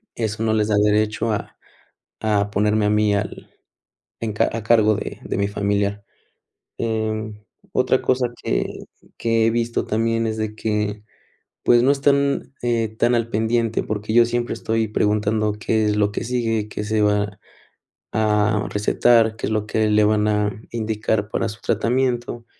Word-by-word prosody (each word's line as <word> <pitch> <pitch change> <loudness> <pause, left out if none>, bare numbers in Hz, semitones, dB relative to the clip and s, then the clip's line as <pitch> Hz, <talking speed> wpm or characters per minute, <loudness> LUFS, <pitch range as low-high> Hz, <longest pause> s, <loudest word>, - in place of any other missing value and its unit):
Eso 110 -1 -3
no 110 - +1
les 110 -1 +1
da 105 - +2
derecho 105 +1 +1
a 105 - -3 0.7
a 105 -2 +1
ponerme 105 +1 +1
a - - +2
mí 105 -1 +2
al 100 +1 -4 0.7
en 115 -2 -2
ca 105 - +1
a 115 -1 -4
cargo 110 -1 +4
de - - -6
de - - -3
mi 100 0 +1
familiar. 100 0 -1 0.8
Eh, 110 -1 -2 0.4
otra 130 0 +2
cosa 130 -1 +1 0.2
que - - 0 0.5
que 115 -1 +2
he - - +3
visto 115 0 -1
también 115 +1 0
es 110 0 -2
de 110 -1 -3
que, 105 -1 -2 0.6
pues, 120 0 +5
no 130 - +4
están, 140 -1 +1
eh, 115 -2 +1
tan 120 +1 +3
al 115 -1 0
pendiente, 115 +1 0
porque 105 0 -4
yo 120 0 +7
siempre 120 0 -2
estoy 115 -1 -1
preguntando 105 0 +1
qué 110 +1 0
es 105 - +1
lo 105 -1 +2
que - - -3
sigue, 115 -3 -1
qué 105 - -5
se 110 0 0
va 105 0 +1 0.8
a 105 -1 +1
recetar, 110 +2 +3
qué - - -3
es - - -3
lo 105 -1 0
que 110 0 +1
le 105 0 +4
van 105 0 +2
a 105 0 0
indicar 110 -2 -1
para - - -1
su 110 - -10
tratamiento. 120 -1 -1
110 Hz, 165 wpm, -21 LUFS, 105-115 Hz, 0.8 s, yo